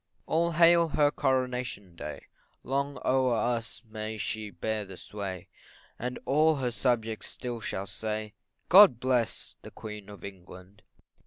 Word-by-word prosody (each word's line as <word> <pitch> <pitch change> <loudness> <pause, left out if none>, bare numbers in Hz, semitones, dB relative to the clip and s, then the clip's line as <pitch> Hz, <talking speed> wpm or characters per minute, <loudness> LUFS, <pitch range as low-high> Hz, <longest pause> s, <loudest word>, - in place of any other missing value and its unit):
All 170 +1 +1
hail 170 +1 +6
her 145 -1 +3
Coronation 125 - -1
day, - - -7 0.4
Long 140 +1 -1
o'er 130 -2 +3
us 115 +1 -1
may 110 0 -5
she 110 0 -3
bear 105 +4 -2
the 95 -2 -10
sway, 95 -4 -6 0.5
And 125 +1 -3
all 155 +3 +4
her 130 -3 -1
subjects 115 -3 -1
still 120 -2 -5
shall 95 -2 -3
say, 105 +1 -4 0.3
God 185 - +8
bless 125 -3 0
the - - -10
Queen 105 -2 -9
of 100 -4 -11
England. 95 +1 -12
115 Hz, 140 wpm, -29 LUFS, 105-135 Hz, 0.5 s, God